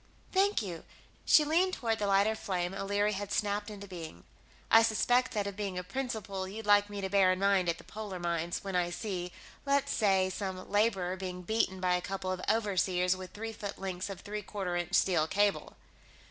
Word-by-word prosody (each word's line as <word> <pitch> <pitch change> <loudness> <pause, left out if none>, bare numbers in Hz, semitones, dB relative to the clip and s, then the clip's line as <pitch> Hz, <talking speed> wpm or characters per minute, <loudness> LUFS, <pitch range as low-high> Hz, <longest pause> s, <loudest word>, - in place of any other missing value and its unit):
"Thank 390 - +2
you." 175 -4 -6 0.4
She 305 - +6
leaned 360 +5 +2
toward 225 -2 -1
the 205 - 0
lighter 200 +2 +4
flame 185 -4 -2
O'Leary 205 +2 0
had 205 0 -4
snapped 205 +1 0
into 200 -1 -8
being. 165 - -8 0.5
"I 225 - +9
suspect 245 +3 +2
that 205 -3 0
of 200 -1 -4
being 200 -3 -3
a 180 - -2
principle 200 -3 -4
you'd 215 +3 -7
like 205 0 +5
me 205 -1 -5
to 190 - -2
bear 195 -2 +5
in 185 - 0
mind 195 -2 +2
at 165 - 0
the - - -13
polar 210 -3 -6
mines, 170 -1 -2
when 195 -2 -4
I 175 -1 +2
see, 180 -2 -4 0.3
let's 280 0 +1
say, 190 -3 +2
some 185 -1 -5
laborer 195 -4 +1
being 180 -1 -5
beaten 190 -1 0
by 180 -1 +2
a 180 - +1
couple 190 0 -3
of 185 -1 -3
overseers 185 -4 +2
with 185 -1 -9
three 225 +2 -5
foot 205 -1 -6
lengths 190 0 -4
of 195 - -7
three 210 0 -5
quarter 190 -3 -4
inch 175 -1 -1
steel 165 -5 +3
cable." 205 +3 0
195 Hz, 200 wpm, -31 LUFS, 185-210 Hz, 0.5 s, I